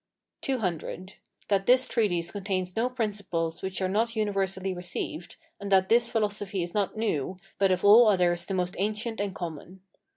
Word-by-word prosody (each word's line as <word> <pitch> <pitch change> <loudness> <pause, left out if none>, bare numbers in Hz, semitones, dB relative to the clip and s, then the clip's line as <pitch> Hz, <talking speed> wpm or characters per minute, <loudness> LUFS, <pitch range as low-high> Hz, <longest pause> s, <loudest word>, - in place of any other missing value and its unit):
CC. 190 - -3 0.3
That 195 -1 +1
this 255 +1 +5
treatise 175 -7 0
contains 185 -3 -3
no 235 +3 +1
principles 200 -9 -2
which 190 0 -3
are - - +2
not 225 +5 0
universally 195 -3 -1
received; 175 -2 -5 0.2
and 200 0 -6
that 190 -1 +4
this 235 +1 +4
philosophy 205 -4 -1
is 175 - -5
not 205 0 -1
new, 190 -6 -1 0.2
but 195 -1 +4
of 185 +1 0
all 220 +3 +8
others 175 -4 +2
the 195 - -2
most 180 -1 -1
ancient 215 +2 -1
and 200 -2 -3
common. 175 +2 -7
195 Hz, 165 wpm, -27 LUFS, 180-215 Hz, 0.3 s, all